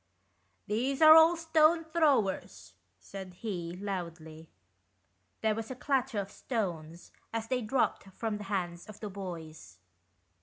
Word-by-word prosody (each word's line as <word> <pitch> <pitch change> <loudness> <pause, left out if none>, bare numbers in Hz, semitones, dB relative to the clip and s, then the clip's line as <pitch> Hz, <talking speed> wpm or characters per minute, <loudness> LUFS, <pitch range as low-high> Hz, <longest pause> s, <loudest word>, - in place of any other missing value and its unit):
"These 250 +6 -1
are 310 0 +11
all 325 +2 +7
stone 325 0 +3
throwers," 220 - 0 0.2
said 185 - -9
he, 175 -5 -5
loudly. 170 -5 -6 0.9
There 220 -1 +2
was 225 0 -5
a 260 - -5
clatter 260 -2 -1
of 200 0 -3
stones 175 -10 -4 0.2
as 225 0 -4
they 255 -1 0
dropped 240 0 0
from 210 +2 -4
the 210 - -7
hands 175 -4 -3
of 215 -1 -11
the 210 -2 -6
boys. 165 - -8
210 Hz, 130 wpm, -31 LUFS, 175-260 Hz, 0.9 s, are